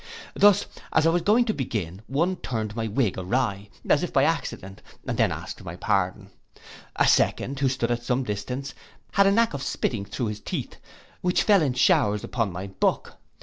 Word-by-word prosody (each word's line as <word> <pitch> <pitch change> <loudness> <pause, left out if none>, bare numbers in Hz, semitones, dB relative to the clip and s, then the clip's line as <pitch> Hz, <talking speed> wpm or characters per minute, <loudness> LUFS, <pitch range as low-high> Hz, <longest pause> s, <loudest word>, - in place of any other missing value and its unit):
Thus, 205 -1 +5 0.3
as 160 - +3
I 165 - +5
was 175 +1 +1
going 220 +7 +3
to 220 - 0
begin, 105 - -4
one 170 +7 0
turned 110 -4 -4
my 115 -1 -2
wig 110 -3 0
awry, 100 0 -1 0.2
as - - +4
if - - -3
by - - +3
accident, 95 +1 -2 0.2
and - - -2
then - - +2
asked - - -7
my - - -7
pardon. 95 +1 -1 0.6
A - - +3
second, 135 +1 +2
who 135 -1 +2
stood 125 -2 -1
at 120 0 -1
some 125 +2 0
distance, 125 +5 -4 0.4
had 200 0 +4
a - - +5
knack 230 -1 +3
of 140 - -4
spitting 115 -6 -2
through 115 +2 -3
his 105 0 -5
teeth, - - -5 0.4
which 180 0 +2
fell 200 -4 +5
in 140 -5 +1
showers 125 - +3
upon 115 -5 -1
my 90 +2 -5
book. 95 - -1
125 Hz, 190 wpm, -25 LUFS, 105-160 Hz, 0.6 s, Thus